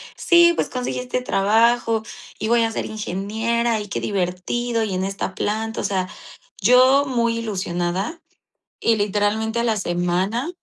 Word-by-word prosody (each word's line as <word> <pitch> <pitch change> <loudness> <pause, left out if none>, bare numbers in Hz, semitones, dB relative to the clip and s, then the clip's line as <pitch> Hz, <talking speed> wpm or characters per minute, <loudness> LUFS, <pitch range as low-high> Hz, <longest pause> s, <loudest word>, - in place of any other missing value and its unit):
"Sí, 345 0 +5
pues - - -1
conseguí 250 0 -3
este 250 0 -3
trabajo, 225 +1 +2 0.4
y 220 - -2
voy 235 0 +3
a 225 - 0
ser - - -3
ingeniera, 220 +3 -1
y 205 - -6
qué - - -2
divertido, 205 +5 -1
y 200 -3 -3
en 185 - -1
esta 195 +1 -4
planta". 220 +2 -2
O - - -6
sea, 185 -2 -1 0.5
yo 255 +6 +5
muy 235 -3 0
ilusionada, 190 - -3 0.6
y 230 - +3
literalmente 210 +3 0
a - - +1
la 225 -2 +1
semana, 185 - -1
220 Hz, 155 wpm, -21 LUFS, 195-235 Hz, 0.6 s, Sí